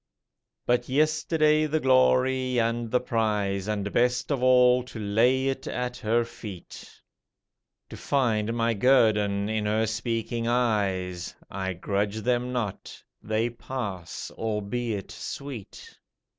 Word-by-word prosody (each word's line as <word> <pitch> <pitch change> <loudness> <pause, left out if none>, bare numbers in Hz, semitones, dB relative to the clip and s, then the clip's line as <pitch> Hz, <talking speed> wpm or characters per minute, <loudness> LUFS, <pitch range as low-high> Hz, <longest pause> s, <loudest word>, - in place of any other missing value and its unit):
But 120 +1 +1
yesterday 155 +1 +2
the 155 +1 0
glory 130 -1 +3
and 115 0 0
the 125 - +2
prize, 105 -5 -1
And 100 -1 -2
best 125 +3 +1
of 135 -3 0
all, 125 0 +5
to 125 - -10
lay 115 +5 +2
it 135 0 -3
at 125 0 -3
her 115 +2 +1
feet, 105 -6 -10 1.0
To - - -7
find 115 -6 0
my 115 0 +1
guerdon 105 -4 +3
in 110 -1 -1
her 110 +1 +1
speaking 115 +1 -2
eyes: 100 -7 0 0.2
I 95 0 -3
grudge 100 +3 -2
them 125 +1 0
not, 115 -6 -4 0.2
they 110 +2 -1
pass, 105 -8 -6
albeit 110 -1 -3
sweet. 135 -8 -8
115 Hz, 120 wpm, -26 LUFS, 105-125 Hz, 1.0 s, all